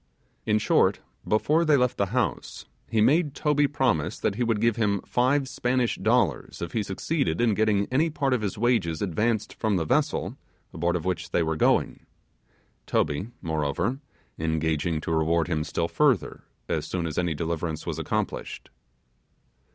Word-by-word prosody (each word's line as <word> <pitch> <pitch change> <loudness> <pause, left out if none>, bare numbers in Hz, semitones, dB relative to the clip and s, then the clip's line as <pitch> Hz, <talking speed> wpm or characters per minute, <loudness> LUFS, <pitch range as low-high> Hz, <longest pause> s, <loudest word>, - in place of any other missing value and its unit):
In 105 - +3
short, 110 - +3 0.3
before 150 +10 +2
they 155 -3 +4
left 125 -1 +1
the 100 - +1
house, 115 - -2 0.2
he 115 -2 +2
made 145 +4 +3
Toby 145 -1 +2
promise 130 - 0
that - - 0
he 120 +5 -1
would 115 -3 +1
give 115 0 +2
him 105 -3 +1
five 130 +3 +1
Spanish 125 -2 0
dollars 110 - +1
if 85 - -5
he 115 - 0
succeeded 130 - -1
in 120 -2 +3
getting 105 -1 +2
any 155 +6 +2
part 140 -3 0
of 125 - 0
his 100 -3 -3
wages 105 -8 +1
advanced 105 +4 -1
from 110 -3 0
the 85 -3 0
vessel, - - 0 0.4
aboard 85 +2 0
of 85 -1 -3
which 90 -2 -2
they 85 - +1
were 80 0 -1
going; - - +1 0.8
Toby, 75 +6 0 0.2
moreover, 80 - -1 0.4
engaging 80 0 0
to 85 - -4
reward 80 +1 +2
him 80 -3 -1
still 85 +1 -2
further, 135 - +1 0.2
as - - -2
soon 90 -2 -2
as 80 -2 -4
my 85 -2 0
deliverance 80 0 -3
was - - -3
accomplished. - - -3
105 Hz, 165 wpm, -26 LUFS, 85-125 Hz, 0.8 s, they